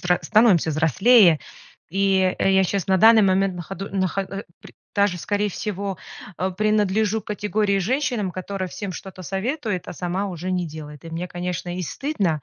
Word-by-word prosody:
взр 180 0 +2
становимся 215 -7 +4
взрослее. 170 - +5 0.5
И 190 0 +2
я 190 0 +3
щас 195 0 -1
на 190 -1 +3
данный 225 +2 +7
момент 190 -1 +2
находу 195 +3 -6
нахо 190 0 -1
а, 195 0 -6
э, - - -8 0.2
пр - - -14 0.2
даже 200 -3 +2
скорее 205 +4 -1
всего, 200 -1 -4 0.4
а, 185 +1 -1
принадлежу 215 +1 +1
к - - -39
категории 210 -1 0
женщинам, 235 -2 -1
которая 185 +1 -4
всем 200 +2 -6
что-то 185 +1 -9
советует, 200 - -3
а - - -5
сама 180 +4 -2
уже 180 0 -5
не 180 -2 -1
делает. 150 -1 -10
И 165 - -8
мне, 175 +2 -4
конечно, 175 0 -4
и - - -2
стыдно, 185 - -2
190 Hz, 175 wpm, -23 LUFS, 180-205 Hz, 0.5 s, данный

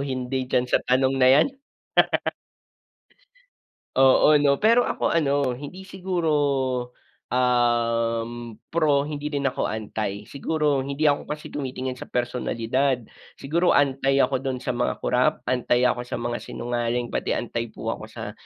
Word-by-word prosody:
hindi 130 -1 -3
diyan 125 - +2
sa 125 - +1
tanong 130 +1 +3
na 130 - +6
'yan. 140 - +5 2.5
Oo, 135 +3 +6
'no. 145 -1 +4
Pero 235 +3 +5
ako - - -1
ano, 140 -4 +2
hindi 145 +9 -7
siguro, 185 -4 -2 1.0
um, 120 -1 0 0.2
pro, 155 -4 +2
hindi 150 0 -5
rin 140 -1 +1
ako - - -2
anti, 105 -1 -4
siguro 150 0 0
hindi 140 +3 +1
ako 145 - -2
kasi 150 0 -6
tumitingin 130 -2 -4
sa - - -8
personalidad. 125 +1 -1 0.3
Siguro 170 +6 +1
anti 135 -1 +3
ako 130 - +1
do'n 130 -2 -3
sa - - -2
mga 125 0 0
corrupt, 125 +5 +1
anti 125 -1 +1
ako 125 -1 +1
sa - - -6
mga 120 0 -2
sinungaling, 120 0 -3
pati - - -1
anti 115 -1 -3
po 110 - -5
ako - - -5
sa - - -7
130 Hz, 140 wpm, -24 LUFS, 120-145 Hz, 2.5 s, na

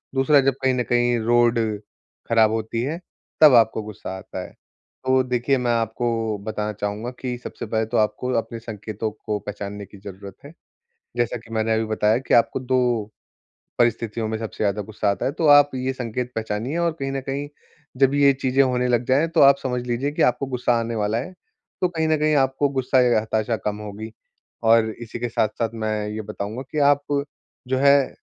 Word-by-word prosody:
दूसरा 135 +2 +4
जब 135 0 +2
कहीं 130 -1 +2
न 125 -1 0
कहीं 120 0 +3
रोड 120 0 +3 0.7
खराब 110 -2 +4
होती 110 +1 -2
है, 160 +6 -3 0.4
तब 150 -3 +9
आपको 110 -1 +3
गुस्सा 105 -3 -7
आता 95 -1 -7
है। - - -12 0.5
तो 130 0 +4
देखिए 125 +2 0
मैं 125 -1 0
आपको 115 -1 -1
बताना 105 0 -3
चाहूँगा 105 +3 -4
कि 125 -2 -3
सबसे - - -7
पहले 110 0 -1
तो 115 +2 -2
आपको 110 +4 0
अपने 115 0 -3
संकेतों 110 -1 -5
को 105 -2 -1
पहचानने 100 0 -6
की 100 - -15
ज़रूरत 100 0 -10
है। 145 - -11 0.6
जैसा 120 0 0
कि 115 0 -16
मैंने 110 0 +1
अभी 110 0 0
बताया 110 0 +2
कि 135 - -3
आपको 120 +2 +3
2 125 -4 0 0.7
परिस्थितियों 115 -1 0
में 110 0 -2
सबसे 110 -1 -4
ज़्यादा 105 0 0
गुस्सा 105 0 -2
आता - - -3
है - - +1
तो 160 +2 -2
आप 145 0 +7
ये 130 +1 -2
संकेत 125 0 -4
पहचानिए 110 +7 -3
और 170 -1 +1
कहीं 135 0 -2
न 135 0 -3
कहीं 140 +2 -4 0.5
जब 135 0 +4
ये 140 -1 +5
चीजें 130 +1 +3
होने 125 -1 +1
लग 120 -1 +2
जाएँ 140 +6 +3
तो - - +5
आप 140 0 +7
समझ 125 -1 -1
लीजिए 130 +4 -1
कि - - -3
आपको 125 +2 +2
गुस्सा 125 -1 0
आने 115 0 -3
वाला 105 +1 0
है, 125 - -4 0.5
तो 180 - +4
कहीं 160 -2 -1
न 155 0 +2
कहीं 155 0 +2
आपको 135 +1 +2
गुस्सा 130 -1 +1
या 120 -3 +3
हताशा 110 +1 -1
कम 105 0 -1
होगी। 105 +1 -7 0.5
और 115 0 +4
इसी 120 0 -7
के 120 0 -2
साथ-साथ 110 0 0
मैं 110 -1 -2
ये 110 +1 -4
बताऊंँगा, 105 +3 -5
कि - - -4
आप 145 0 +4 0.6
जो 130 +1 0
है, 140 0 +4
120 Hz, 195 wpm, -23 LUFS, 110-130 Hz, 0.7 s, तब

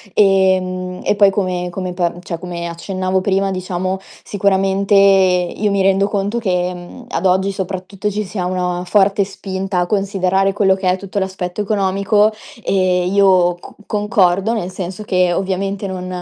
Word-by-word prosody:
Ehm, 185 -2 +2
e - - +1
poi 200 -1 +5
come 185 -2 -2
come 185 0 -4
pa 175 -1 0
cioè, 175 -2 -5 0.3
accennavo 185 +2 -2
prima, 195 0 0
diciamo, 185 0 -3 0.2
sicuramente 195 0 +1
io 195 0 +3
mi 200 - +1
rendo 195 +1 +3
conto 205 +3 -1
che, 180 -4 0
mhmm, 175 0 -11
ad - - -2
oggi 190 +1 +2
soprattutto 190 +1 -4
ci 210 +2 -2
sia 185 -1 -4
una 180 -1 -2
forte 200 +1 +3
spinta 190 -1 -4
a 175 - +1
considerare 195 -1 +1
quello 195 -2 +3
che 190 -1 -1
è 185 - +1
tutto 195 +1 -4
l'aspetto 190 0 -3
economico 200 +1 +2 0.3
e 185 -2 +1
io 185 -2 +4
cu - - -13
concordo, 205 -1 +1
nel 185 -5 -3
senso 185 +2 -6
che 180 -3 +1
ovviamente 195 +2 -2
non 185 -1 -5
190 Hz, 155 wpm, -17 LUFS, 185-200 Hz, 0.3 s, poi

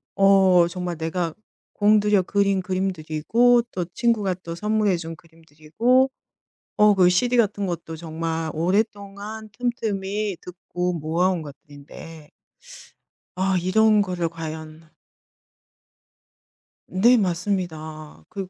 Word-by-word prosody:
어 190 -3 +5
정말 180 -1 -4
내가 165 +1 -2 0.4
공들여 210 -1 +3
그린 200 0 +1
그림들이고 190 +6 +1
또 180 -2 -3
친구가 215 -6 +1
또 170 -2 -8
선물해 210 -1 +1
준 165 0 -7
그림들이고 165 - -1 0.7
어 210 -1 +6
그 185 -2 +5
CD 245 +7 +2
같은 205 -3 +1
것도 170 -2 -5
정말 160 0 -4
오랫동안 205 +4 -2
틈틈이 210 -5 -2
듣고 180 0 -4
모아 165 +3 0
온 175 -4 -2
것들인데' 145 +2 -12 1.1
'아 190 +1 0
이런 215 +4 +3
거를 180 -4 -2
과연' 160 -1 -8 2.0
네 235 +7 +4
맞습니다. 170 -5 -3
극 195 -3 -6
185 Hz, 220 characters per minute, -23 LUFS, 165-205 Hz, 2.0 s, 어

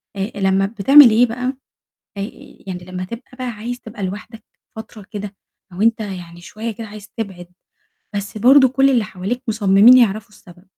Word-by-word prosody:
آآ 195 +1 -3
لمّا 195 0 +1
بتعمل 240 +7 +6
إيه 230 +3 +4
بقى 245 +2 -5 0.7
آآ، 200 - -3 0.5
يعني 180 -2 -6
لمّا 185 0 -6
تبقى 230 +6 -10
بقى 255 -1 -5
عايز 235 +2 -6
تبقى 220 -2 -9
لوحدك 210 +4 -7 0.3
فترة 220 -2 -11
كده، 205 -2 -7 0.4
أو 180 - -6
أنت 230 +1 +2
يعني 175 -4 -8
شوية 220 +6 -6
كده 220 +1 -9
عايز 210 0 -12
تبعد، 190 -6 -6 0.7
بس 200 +1 -5
برضه 265 +5 +6
كل 270 +2 +2
اللي 245 -5 +2
حواليك 210 +5 -5
مصممين 210 +2 +5
يعرفوا 220 -2 +1
السبب، 180 -4 -18
215 Hz, 165 wpm, -19 LUFS, 195-235 Hz, 0.7 s, بتعمل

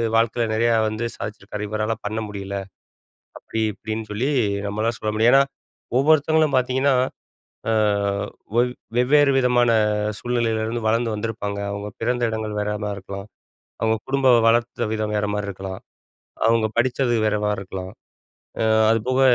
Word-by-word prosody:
வாழ்க்கையில 115 +1 +2
நிறையா 115 +1 +3
வந்து 110 +2 -3
சாதிச்சிருக்காரு. 105 0 -6
இவரால 110 +1 -1
பண்ண 110 +2 -2
முடியல. 100 -1 -6 0.8
அப்டி 110 - -4
இப்டின்னு 110 +1 -5
சொல்லி, 120 +7 -1 0.4
நம்மளால 110 +3 -1
சொல்ல 110 0 -2
முடியும். 115 +3 +4
ஏன்னா, 135 0 +7 0.6
ஒவ்வொருத்தவங்களும் 155 0 +3
பார்த்தீங்கன்னா, 130 +2 +2 0.8
அ - - +2 0.9
ஒவ் 125 - +4 0.3
வெவ்வேறு 140 +3 +5
விதமான 120 -2 +3 0.5
சூழ்நிலையில 115 -2 0
இருந்து 115 +1 -3
வளர்ந்து 115 +1 +2
வந்திருப்பாங்க. 105 -2 -3
அவுங்க 100 0 -5
பிறந்த 125 0 0
இடங்கள் 110 -1 -3
வேறமாரி 105 0 -2
இருக்கலாம். 100 +1 -8 0.5
அவுங்க 110 0 +2
குடும்ப 135 -1 +2 0.2
வளர்த்த 120 0 +1
விதம் 110 -1 -2
வேறமாரி 105 0 -1
இருக்கலாம். 95 0 -6 0.7
அவுங்க 115 -1 +3
படிச்சது 125 0 +2
வேறமாரி 105 -1 0
இருக்கலாம். 95 -1 -7 0.7
அ - - +2 0.3
அதுபோக 125 +4 0
110 Hz, 125 wpm, -22 LUFS, 105-120 Hz, 0.9 s, ஏன்னா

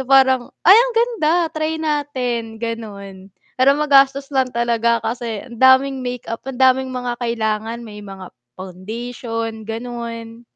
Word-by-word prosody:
So - - -3
parang, 265 -2 +4
"Ay, 380 +4 +9
ang - - +4
ganda, 455 -10 +2 0.2
try 310 +1 -1
natin." 255 -7 -2
Gano'n. 200 -4 -7 0.3
Pero 260 +2 +6
magastos 275 -2 +4
lang 260 -1 +2
talaga 235 0 +1
kasi 230 -1 -4
ang 235 -2 -11
daming 260 +1 +5
makeup, 245 -2 -5
ang 255 - -6
daming 260 0 +4
mga 250 -1 -3
kailangan 225 0 -2
may 210 -2 -10
mga 195 -2 -9 0.3
foundation, 225 +4 -6
gano'n. 230 0 -6
240 Hz, 135 wpm, -19 LUFS, 225-265 Hz, 0.3 s, Ay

